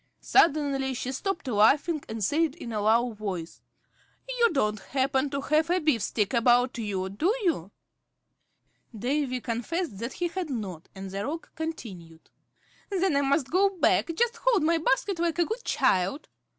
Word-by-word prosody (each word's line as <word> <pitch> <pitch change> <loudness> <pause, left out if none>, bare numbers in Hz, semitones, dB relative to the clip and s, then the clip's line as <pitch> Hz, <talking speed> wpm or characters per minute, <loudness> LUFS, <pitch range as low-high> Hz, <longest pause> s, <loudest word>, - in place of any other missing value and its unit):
Suddenly 280 -7 +2
she 250 +1 -3
stopped 340 +3 -3
laughing, 275 +8 +3
and 220 -1 -4
said 305 - +1
in 240 -9 -7
a 210 - -1
low 230 +3 +3
voice, 195 -6 -6 0.7
"You - - +2
don't 215 -8 0
happen 270 +3 0
to 280 0 -3
have 310 +3 +1
a 355 - +3
beefsteak 230 - 0
about 245 +1 +3
you, 195 -4 -2
do 200 - -1 0.2
you?" 290 - 0 1.3
Davy 255 +2 -1
confessed 240 - -3
that 235 +3 -4
he 350 -1 -2
had 355 -1 -4
not, 195 - -5
and 190 0 -7
the 195 +1 -3
Roc 320 +7 -5
continued, 190 - -7 0.6
"Then 380 -5 +1
I 280 - +3
must 280 -1 +1
go 390 +3 +4
back. 345 - +3
Just 475 +4 +1
hold 485 -9 +2
my 330 +1 +2
basket, 335 +5 0
like 340 -1 0
a 345 - +3
good 450 +5 -4
child." 190 - +1
270 Hz, 160 wpm, -27 LUFS, 215-330 Hz, 1.3 s, go